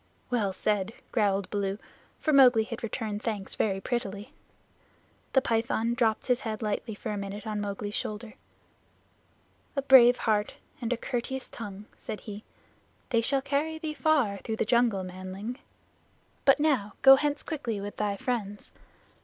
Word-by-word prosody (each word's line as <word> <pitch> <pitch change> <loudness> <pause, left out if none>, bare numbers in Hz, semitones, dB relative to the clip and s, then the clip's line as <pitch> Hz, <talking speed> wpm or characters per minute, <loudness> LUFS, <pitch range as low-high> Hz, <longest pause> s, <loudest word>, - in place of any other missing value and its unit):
"Well 215 -5 +1
said," 205 +2 -1 0.2
growled 200 -4 +1
Baloo, 200 -1 -1 0.4
for 310 - +1
Mowgli 250 -5 +7
had 230 +1 -7
returned 215 -2 -3
thanks 210 -4 -3
very 195 -3 0
prettily. 205 -3 -4 1.0
The 265 - +4
Python 230 0 +1
dropped 230 -3 +1
his 250 -1 +2
head 220 -3 -4
lightly 210 +1 -2
for 220 - -6
a 210 - -2
minute 200 +2 -6
on 210 -1 -2
Mowgli's 205 0 -4
shoulder. 215 +2 -4 1.4
"A 275 - 0
brave 250 -2 +8
heart 210 -2 0 0.3
and 235 0 -2
a 245 - +1
courteous 255 +2 -4
tongue," 205 -3 -8
said 215 - -6
he. 210 0 -8 0.7
"They 230 -2 +3
shall 270 +3 +1
carry 295 +3 -1
thee 315 -1 -4
far 290 -11 +2
through 220 - -4
the - - 0
jungle, 235 -4 +2
manling. 185 +6 -6 0.9
But 275 +1 +6
now 265 -10 +1
go 270 0 +11
hence 290 +1 -1
quickly 250 -10 -3
with 205 +1 -6
thy 205 -1 -1
friends. 205 -4 -3
225 Hz, 155 wpm, -28 LUFS, 205-250 Hz, 1.4 s, go